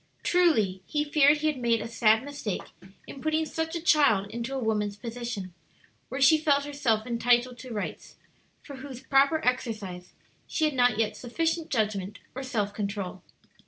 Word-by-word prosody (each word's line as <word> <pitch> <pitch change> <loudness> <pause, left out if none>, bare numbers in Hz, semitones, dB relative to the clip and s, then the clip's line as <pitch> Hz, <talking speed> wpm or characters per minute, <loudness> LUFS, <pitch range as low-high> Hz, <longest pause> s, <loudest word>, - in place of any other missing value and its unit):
Truly, 225 - +2
he 295 -1 0
feared 295 0 +4
he 300 - -4
had 300 -4 +1
made 235 -2 +2
a - - -5
sad 225 0 +3
mistake 285 -9 -5 0.4
in 275 - -10
putting 315 +1 +1
such 320 +1 -3
a - - -1
child 285 - +4
into 235 +3 -4
a - - -1
woman's 210 -3 -1
position, 230 -5 -6 0.6
where 265 - -4
she 280 +3 +6
felt 285 -2 +2
herself 240 -7 0
entitled 245 +1 +1
to 255 - -9
rights, 210 -2 -5 0.5
for 280 -3 -9
whose 260 -2 -9
proper 280 +3 +3
exercise 215 -8 -2 0.3
she 315 - 0
had 305 - +1
not 245 -4 +3
yet 220 -1 0
sufficient 325 +6 -2
judgment 210 -4 -1 0.2
or 265 - -5
self 215 -6 -2
control. 200 -3 -4
245 Hz, 165 wpm, -27 LUFS, 215-290 Hz, 0.6 s, she